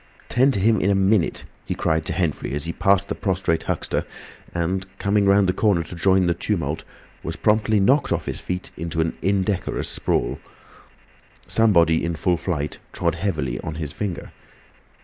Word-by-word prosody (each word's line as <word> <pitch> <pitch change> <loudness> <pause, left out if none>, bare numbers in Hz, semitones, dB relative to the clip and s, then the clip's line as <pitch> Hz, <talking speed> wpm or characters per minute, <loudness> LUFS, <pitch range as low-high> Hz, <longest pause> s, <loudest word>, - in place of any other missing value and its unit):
"'Tend 130 +3 +4
to 115 - -1
him 110 +2 +3
in 95 - +2
a 100 - +3
minute!" 95 -1 +2 0.2
he - - -3
cried 80 0 0
to - - 0
Henfrey 80 -5 -1
as 75 - -2
he 85 +1 -3
passed 100 0 +3
the - - -2
prostrate 95 -4 0
Huxter, - - -2 0.5
and, 90 +2 -1
coming 100 +1 +2
round 100 0 +5
the 90 - +2
corner 95 -4 +2
to 85 - -10
join 95 +2 +3
the 85 - +2
tumult, 85 -4 -2 0.4
was - - -5
promptly 110 0 +2
knocked 135 +9 +3
off - - 0
his - - -4
feet 90 0 -5
into 80 0 -4
an 80 0 0
indecorous 95 0 0
sprawl. - - -1 1.1
Somebody 85 -8 +4
in 85 0 -1
full 85 +2 +1
flight 75 -4 -3
trod - - 0
heavily 75 -11 -2
on 75 - -5
his 80 -3 -4
finger. 90 -3 -5
90 Hz, 175 wpm, -23 LUFS, 80-100 Hz, 1.1 s, round